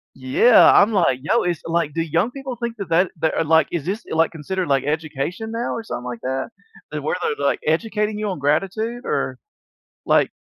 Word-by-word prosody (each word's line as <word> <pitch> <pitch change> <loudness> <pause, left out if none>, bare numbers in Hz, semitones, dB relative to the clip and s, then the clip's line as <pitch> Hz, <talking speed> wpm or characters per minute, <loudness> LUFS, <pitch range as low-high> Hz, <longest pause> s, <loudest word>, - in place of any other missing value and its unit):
Yeah, 135 - +5
I'm 205 +3 +5
like, 165 -10 +2
"Yo" 230 +9 +2
it's 175 -3 -1
like, 165 -3 -1
do 165 - -1
young 165 +8 0
people 270 -2 -6
think 235 -1 -5
that 195 -4 -6
that 175 +3 +2
that 160 - +1
are, - - +1
like 160 +1 +4
is 170 -3 -3
this, 205 +5 -3
like, 160 0 +2
considered, 180 +4 -3
like, 135 -2 +2
education 155 +7 -3
now 230 +1 -2
or 230 - -4
something 125 - -6
like 120 -2 -6
that? 130 +1 -3 0.4
Eh, - - -2
where - - -2
they're, 455 0 0
like, - - +1
educating 210 +5 0
you 215 -1 -2
on 185 - -4
gratitude? 195 - -1
Or - - -1 0.7
like - - +3
175 Hz, 205 wpm, -21 LUFS, 150-220 Hz, 0.7 s, Yeah